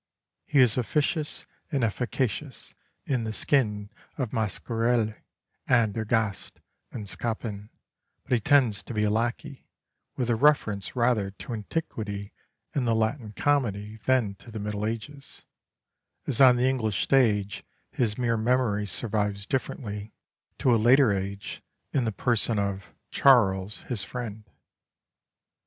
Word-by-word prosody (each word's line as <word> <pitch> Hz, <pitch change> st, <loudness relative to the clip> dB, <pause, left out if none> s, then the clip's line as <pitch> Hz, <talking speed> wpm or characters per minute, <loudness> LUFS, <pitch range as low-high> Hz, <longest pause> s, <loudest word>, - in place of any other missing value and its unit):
He 150 Hz, -, 0 dB
is 125 Hz, -1 st, +4 dB
officious 150 Hz, +4 st, -1 dB, 0.3 s
and 140 Hz, -5 st, 0 dB
efficacious 125 Hz, +4 st, -2 dB, 0.3 s
in 130 Hz, -4 st, 0 dB
the 110 Hz, -, -3 dB
skin 105 Hz, -5 st, 0 dB, 0.3 s
of 125 Hz, -6 st, -2 dB
Mascarille 115 Hz, +1 st, 0 dB, 0.5 s
and 115 Hz, -5 st, +3 dB
Ergaste 110 Hz, -2 st, -1 dB, 0.3 s
and 105 Hz, -4 st, -6 dB
Scapin; 105 Hz, 0 st, -3 dB, 0.5 s
but -, -, -16 dB
he 125 Hz, -, +4 dB
tends 125 Hz, -4 st, +3 dB
to 120 Hz, -, -8 dB
be 105 Hz, -, +1 dB
a 105 Hz, -, +2 dB
lacquey, 120 Hz, +4 st, -2 dB, 0.5 s
with 125 Hz, -, 0 dB
a -, -, +3 dB
reference 110 Hz, -7 st, +2 dB
rather 120 Hz, -5 st, +2 dB
to 100 Hz, +5 st, -8 dB
Antiquity 105 Hz, -4 st, -4 dB, 0.4 s
and 130 Hz, -4 st, 0 dB
the 115 Hz, -, +3 dB
Latin 110 Hz, 0 st, -1 dB
comedy 110 Hz, -5 st, 0 dB
than 125 Hz, -6 st, +3 dB
to -, -, -14 dB
the 110 Hz, -, -7 dB
Middle 105 Hz, 0 st, -2 dB
Ages, 135 Hz, +6 st, -7 dB, 0.8 s
as 135 Hz, -2 st, 0 dB
on 130 Hz, -2 st, +8 dB
the 125 Hz, +1 st, +2 dB
English 110 Hz, -6 st, 0 dB
stage 105 Hz, -7 st, +2 dB, 0.3 s
his 110 Hz, -4 st, 0 dB
mere 120 Hz, -2 st, +1 dB
memory 110 Hz, -3 st, +1 dB
survives 105 Hz, -2 st, -1 dB
differently 105 Hz, -5 st, -4 dB, 0.4 s
to 125 Hz, -, +3 dB
a 115 Hz, -, +3 dB
later 125 Hz, +1 st, +6 dB
age 100 Hz, 0 st, -4 dB, 0.3 s
in 130 Hz, -4 st, +1 dB
the 110 Hz, -, 0 dB
person 115 Hz, +1 st, +1 dB
of 100 Hz, -3 st, -2 dB, 0.2 s
"Charles, 105 Hz, -7 st, +4 dB
his 115 Hz, -6 st, -2 dB
friend." 110 Hz, -3 st, -6 dB
115 Hz, 135 wpm, -27 LUFS, 105-125 Hz, 0.8 s, on